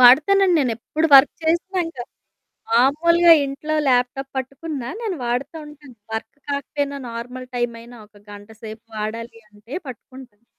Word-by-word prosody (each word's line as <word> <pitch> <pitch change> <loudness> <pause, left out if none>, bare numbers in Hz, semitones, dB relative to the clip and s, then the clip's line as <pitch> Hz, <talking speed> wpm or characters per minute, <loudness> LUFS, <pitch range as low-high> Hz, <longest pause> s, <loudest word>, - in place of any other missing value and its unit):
వాడతానండి. 345 +10 +6
నేనెప్పుడు 260 +4 -1
వర్క్ 270 +1 +8
చేసినా, 345 +4 0
ఇంకా 260 -7 -7 0.7
మామూలుగా 330 +8 +5
ఇంట్లో 285 +3 -3
ల్యాప్టాప్ 255 +1 +1
పట్టుకున్నా 270 0 -5
నేను 425 -5 -2
వాడుతా 250 +6 -2
ఉంటాను. 295 -4 -14 0.2
వర్క్ 220 0 -4 0.2
కాకపోయినా 280 0 -2
నార్మల్ 245 +2 -7
టైమ్ 240 -1 -1
అయినా 240 +1 -13
ఒక 205 -1 -21
గంట 205 +1 -12
సేపు 220 +1 -8
వాడాలి 230 +2 -5
అంటే 210 +4 -14
పట్టుకుంటాను. 250 -3 -12
260 Hz, 130 wpm, -21 LUFS, 235-300 Hz, 0.7 s, వర్క్